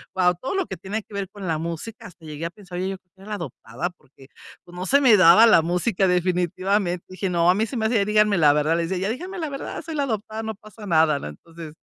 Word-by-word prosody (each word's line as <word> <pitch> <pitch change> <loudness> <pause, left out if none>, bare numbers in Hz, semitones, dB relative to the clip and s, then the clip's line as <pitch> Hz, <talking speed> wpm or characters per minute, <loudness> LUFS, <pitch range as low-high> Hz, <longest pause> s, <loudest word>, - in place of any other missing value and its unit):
Wao, 180 -1 +3
todo 260 - -5
lo 385 -2 0
que - - -5
tiene 205 +3 -5
que - - -18
ver 200 -2 -4
con 200 -2 -8
la 160 -2 0
música, 170 +8 -6
hasta 170 -2 -17
llegué 155 +1 -6
a - - -2
pensar 180 -3 -9
yo 190 +1 -3
que 185 -1 -47
era 210 +2 -6
adoptada, 145 - -5
porque, 135 -6 -21 0.4
pues, 175 - -14
no 185 - -4
se 280 - +5
me 250 -6 +7
daba 185 +6 +8
la 215 - +6
música 180 +4 0
definitivamente. 180 +1 0
Dije: 185 +1 -3
"No, 170 -1 +2
a 180 - +5
mí 215 +3 +1
se 255 - -5
me 220 - -1
hacía, 220 -3 +2
díganme 210 -1 +3
la 150 -4 +6
verdad, 150 +2 +1
les 165 -1 -2
decía, 190 +1 -1
ya - - 0
díganme 365 +8 -7
la 320 - -2
verdad, 275 -1 -6
soy 325 -1 -6
la 285 - 0
adoptada, 220 -2 -4
no 220 -1 -4
pasa 215 +1 -13
nada", 160 -4 +3
¿no? - - -7
Entonces, 160 - -11
185 Hz, 260 wpm, -23 LUFS, 170-215 Hz, 0.4 s, daba